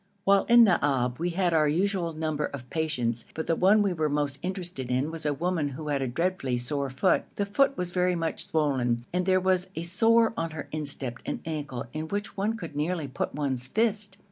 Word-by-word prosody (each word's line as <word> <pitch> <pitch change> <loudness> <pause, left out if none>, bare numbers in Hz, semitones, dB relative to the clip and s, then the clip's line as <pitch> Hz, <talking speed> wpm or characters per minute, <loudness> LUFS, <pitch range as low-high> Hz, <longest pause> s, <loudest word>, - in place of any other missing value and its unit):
While 195 0 +4
in 240 0 +7
Naab 135 - +2
we 175 +2 0
had 175 0 +1
our 155 -2 +4
usual 180 +2 0
number 155 -1 -1
of 130 -3 -8
patients, 125 -8 -1
but 160 - -3
the 165 - +1
one 205 +4 +5
we 195 -3 +1
were 155 -2 0
most 145 -1 -1
interested 180 -8 -4
in 130 +5 0
was 165 -2 -3
a - - +2
woman 170 0 0
who 150 +2 -6
had 140 -2 0
a 135 - 0
dreadfully 135 -2 -1
sore 140 +3 -2
foot. 130 +9 +2
The 200 - 0
foot 275 +7 +2
was 180 -1 -2
very 180 0 +1
much 165 -1 0
swollen, 130 -6 0
and 180 +1 0
there 185 0 +4
was 185 0 +1
a 165 - -3
sore 225 +6 +3
on 165 -4 -2
her 145 - -5
instep 140 -5 -2
and - - -3
ankle 150 -7 -4
in 155 +1 -4
which 200 +2 -4
one 210 +3 -1
could 165 -8 -8
nearly 155 +1 -1
put 130 - -4
one's 130 -4 -1
fist. 210 - 0
160 Hz, 215 wpm, -27 LUFS, 140-185 Hz, -, in